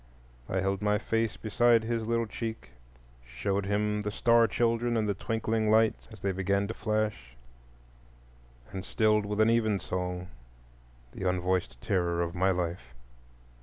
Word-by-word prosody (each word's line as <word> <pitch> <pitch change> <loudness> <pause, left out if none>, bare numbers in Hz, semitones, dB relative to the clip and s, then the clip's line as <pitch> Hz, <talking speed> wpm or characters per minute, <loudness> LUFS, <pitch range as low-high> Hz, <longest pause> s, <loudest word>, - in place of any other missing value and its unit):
I 95 - 0
held 95 0 -1
my 105 0 +2
face 115 0 -1
beside 115 +1 +3
his 115 -1 -2
little 115 0 +1
cheek, 110 - -6 0.5
showed 95 +12 -2
him 105 +1 0
the 105 - -2
star 115 +2 +4
children 120 0 +1
and 110 -1 0
the 100 - +1
twinkling 110 +2 -1
lights 110 0 +3
as 110 -3 -12
they 100 - 0
began 100 +2 0
to - - -2
flash, 105 - -2 1.3
and 95 -1 -5
stilled 105 0 +2
with 105 0 -3
an 110 +1 +5
even 110 -3 +2
song 90 -1 -4 0.8
the 95 +6 -2
unvoiced 90 -9 -1
terror 85 -3 0
of 85 0 -4
my 95 +2 +2
life. 85 -9 -3
105 Hz, 150 wpm, -29 LUFS, 90-110 Hz, 1.3 s, an